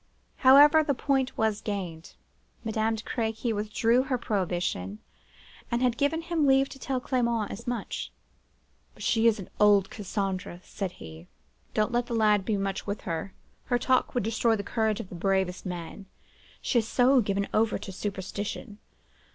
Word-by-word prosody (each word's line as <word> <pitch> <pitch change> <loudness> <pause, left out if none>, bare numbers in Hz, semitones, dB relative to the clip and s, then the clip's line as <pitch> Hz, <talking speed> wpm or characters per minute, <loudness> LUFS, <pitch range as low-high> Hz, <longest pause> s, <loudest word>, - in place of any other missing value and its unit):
However, 290 +4 +7
the 285 -2 0
point 270 0 0
was 220 -1 +1
gained; 180 -6 -5 0.5
Madame 220 0 0
de 220 - -7
Crequy 225 0 -2
withdrew 220 +3 +2
her 260 -1 -1
prohibition, 175 - -2 0.7
and 235 +1 0
had 245 -2 +2
given 290 +5 0
him 330 -4 +1
leave 270 0 +4
to 270 - -11
tell 265 -1 -2
Clement 235 -4 0
as 235 +4 -8
much. 240 -3 -4 0.8
"'But - - -10
she 225 0 +3
is 225 - +4
an 190 - -9
old 205 -2 +5
Cassandra,' 195 -3 -3
said 190 -3 -5
he. 80 +1 -11 0.5
'Don't 215 +2 +2
let 240 0 0
the 235 - -2
lad 210 -3 +3
be 215 -3 0
much 195 0 -3
with 200 +1 -3
her; 170 +2 -4 0.3
her 245 - +1
talk 255 +1 +1
would 245 - +1
destroy 225 +1 +2
the 200 - -4
courage 220 0 0
of 185 - -7
the - - -10
bravest 190 +1 -1
man; 175 +2 -7 0.6
she 245 - +2
is 220 - -3
so 255 +2 +4
given 200 -1 -1
over 220 0 +2
to 195 - -8
superstition. 205 +2 -5
220 Hz, 165 wpm, -28 LUFS, 195-245 Hz, 0.8 s, However